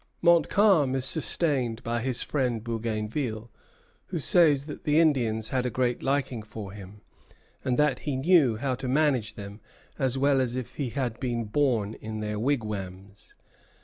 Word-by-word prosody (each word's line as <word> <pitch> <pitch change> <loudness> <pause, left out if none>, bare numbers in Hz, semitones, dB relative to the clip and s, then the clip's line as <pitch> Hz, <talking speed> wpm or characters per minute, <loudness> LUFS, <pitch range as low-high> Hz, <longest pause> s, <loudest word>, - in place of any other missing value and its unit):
Montcalm 170 -3 +4
is 130 -1 -1
sustained 135 -6 0
by 120 0 -2
his 125 0 0
friend 125 -6 -1
Bougainville, 115 0 -3 0.6
who 185 - -4
says 150 -1 +3
that 150 - -8
the 150 0 +3
Indians 120 -9 +2
had 130 -1 0
a 125 - -1
great 125 0 -1
liking 135 -4 -1
for 105 -2 -8
him, 100 +1 -11 0.6
and 125 -1 0
that 150 -3 +2
he 145 -3 -3
"knew 140 -4 +4
how 130 +4 -1
to 130 +1 -5
manage 130 -6 +1
them 100 0 -9 0.4
as 130 -1 0
well 140 0 +3
as 125 -1 -2
if 130 -2 -6
he 140 -4 -2
had 120 -3 -3
been 120 -3 -2
born 110 -3 0
in 110 0 -7
their 105 0 -3
wigwams." 105 -5 -4
125 Hz, 160 wpm, -27 LUFS, 110-140 Hz, 0.6 s, Montcalm